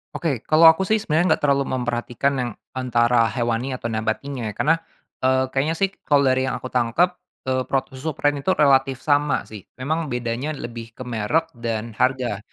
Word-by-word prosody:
Oke. 145 Hz, -8 st, -1 dB
Kalau 155 Hz, +2 st, +5 dB
aku 185 Hz, +4 st, -2 dB
sih 220 Hz, -, +3 dB
sebenernya 160 Hz, -1 st, +2 dB
nggak -, -, -18 dB
terlalu 140 Hz, -1 st, +2 dB
memperhatikan 120 Hz, +2 st, -1 dB
yang 120 Hz, -1 st, -2 dB, 0.2 s
antara 120 Hz, -2 st, +2 dB
hewani 120 Hz, +3 st, -1 dB
atau 115 Hz, -2 st, -4 dB
nabatinya 110 Hz, +3 st, -3 dB
ya, 105 Hz, -, -5 dB
karena, 160 Hz, +8 st, +3 dB, 0.4 s
eee, 130 Hz, 0 st, +2 dB
kayaknya 145 Hz, +5 st, 0 dB
sih 195 Hz, +3 st, +1 dB, 0.2 s
kalau 145 Hz, -1 st, +4 dB
dari 130 Hz, 0 st, +2 dB
yang -, -, -1 dB
aku 130 Hz, -, -7 dB
tangkep, 125 Hz, +9 st, +2 dB, 0.3 s
eee, 130 Hz, 0 st, 0 dB
prot 135 Hz, 0 st, -1 dB
susu 135 Hz, +3 st, -5 dB
protein 145 Hz, -, +2 dB
itu 185 Hz, +7 st, +1 dB
relatif 135 Hz, -2 st, +3 dB
sama 145 Hz, 0 st, +2 dB
sih. 105 Hz, -4 st, -12 dB
Memang 155 Hz, +5 st, -2 dB
bedanya 125 Hz, +4 st, -3 dB
lebih 115 Hz, -3 st, -8 dB
ke -, -, -7 dB
merek 125 Hz, +8 st, -1 dB
dan 115 Hz, -2 st, -4 dB
harga, 125 Hz, -2 st, 0 dB
130 Hz, 180 wpm, -22 LUFS, 120-145 Hz, 0.4 s, Kalau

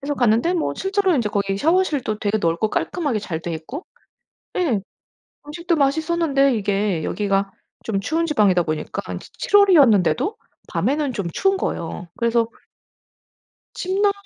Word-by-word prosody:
그래서 290 Hz, +1 st, -2 dB
갔는데 245 Hz, +7 st, +2 dB
뭐 335 Hz, -, 0 dB
실제로 385 Hz, -1 st, +1 dB
인제 235 Hz, -7 st, +1 dB
거기 195 Hz, -1 st, -1 dB
샤워실도 300 Hz, -, +1 dB
되게 215 Hz, 0 st, 0 dB
넓고 170 Hz, +3 st, 0 dB
깔끔하게 290 Hz, -11 st, -1 dB
잘 170 Hz, -6 st, -4 dB
돼 170 Hz, +1 st, -5 dB
있고 245 Hz, -, -7 dB, 0.7 s
예 260 Hz, -, +1 dB, 0.7 s
음식도 335 Hz, +3 st, -1 dB
맛있었는데 280 Hz, -2 st, +2 dB
이게 200 Hz, -4 st, 0 dB
여기가 195 Hz, -1 st, 0 dB, 0.4 s
좀 195 Hz, -, +1 dB
추운 325 Hz, -, 0 dB
지방이다 205 Hz, -, +3 dB
보니까 155 Hz, -1 st, -3 dB, 0.2 s
치 -, -, -15 dB
7 410 Hz, -, +3 dB
월이었는데도 295 Hz, -, +4 dB, 0.3 s
밤에는 285 Hz, 0 st, 0 dB
좀 200 Hz, -6 st, -3 dB
추운 390 Hz, 0 st, +2 dB
거예요. 175 Hz, -, -4 dB
그래서 235 Hz, -1 st, +2 dB, 1.3 s
침낭 395 Hz, +2 st, +1 dB
255 Hz, 315 characters per minute, -21 LUFS, 200-335 Hz, 1.3 s, 월이었는데도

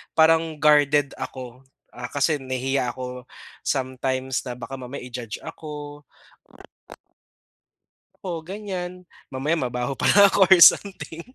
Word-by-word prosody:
Parang 160 Hz, 0 st, +3 dB
guarded 145 Hz, -2 st, +4 dB
ako, 130 Hz, 0 st, -8 dB, 0.3 s
ah, 125 Hz, 0 st, -6 dB
kasi 145 Hz, +1 st, +1 dB
nahihiya 130 Hz, -1 st, -2 dB
ako 125 Hz, -1 st, -7 dB, 0.4 s
sometimes 130 Hz, 0 st, -2 dB
na 120 Hz, -, -5 dB
baka 125 Hz, +2 st, -8 dB
mamaya 125 Hz, +1 st, -8 dB
i-judge 120 Hz, -4 st, -7 dB
ako. 150 Hz, -1 st, -9 dB, 2.2 s
Oo, 170 Hz, -3 st, -4 dB
ganyan. 180 Hz, -1 st, -7 dB, 0.2 s
Mamaya 140 Hz, +5 st, -1 dB
mabaho 125 Hz, 0 st, -2 dB
pala 200 Hz, 0 st, +6 dB
ako 195 Hz, -2 st, +4 dB
or 190 Hz, -, +8 dB
something. 190 Hz, -4 st, +4 dB
140 Hz, 110 wpm, -23 LUFS, 130-160 Hz, 2.2 s, or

